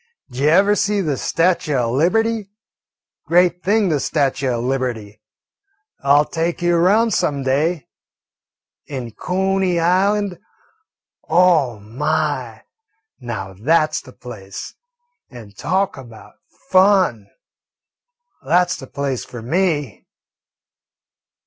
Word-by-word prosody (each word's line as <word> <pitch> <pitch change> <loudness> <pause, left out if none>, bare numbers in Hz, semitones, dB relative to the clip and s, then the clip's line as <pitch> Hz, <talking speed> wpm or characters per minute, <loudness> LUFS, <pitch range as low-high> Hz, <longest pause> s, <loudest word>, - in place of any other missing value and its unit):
"D'jever 160 +11 +3
see 205 0 0
the 155 -7 -1
statue 165 0 0
o' 120 -3 0
Liberty? 215 - +1 0.8
Great 180 +1 +3
thing, 205 0 +2
the 150 -3 +1
statue 140 -1 0
o' 120 -2 -1
Liberty. 120 -5 -3 0.8
I 140 - +4
'll 150 - +2
take 165 +2 -2
you 175 0 +3
'round 215 +7 +3
some 140 -2 0
day. 145 +3 0 1.0
An' 130 -5 -5
Cooney 190 - 0
Island 190 +2 +1 0.9
oh, 160 -8 +3
my, 130 +10 -2 0.6
now 110 -6 -6
that 155 - +1
's - - -2
the 130 - -14
place; 105 -7 -9 0.6
and 110 -5 -13
talk 190 - -1
about 115 -4 -13 0.4
fun! 185 - +3 1.2
That 175 +6 +2
's - - -2
the 135 - -10
place 140 -3 -3
for 120 -2 -10
me." 150 - -1
155 Hz, 110 wpm, -19 LUFS, 125-185 Hz, 1.2 s, I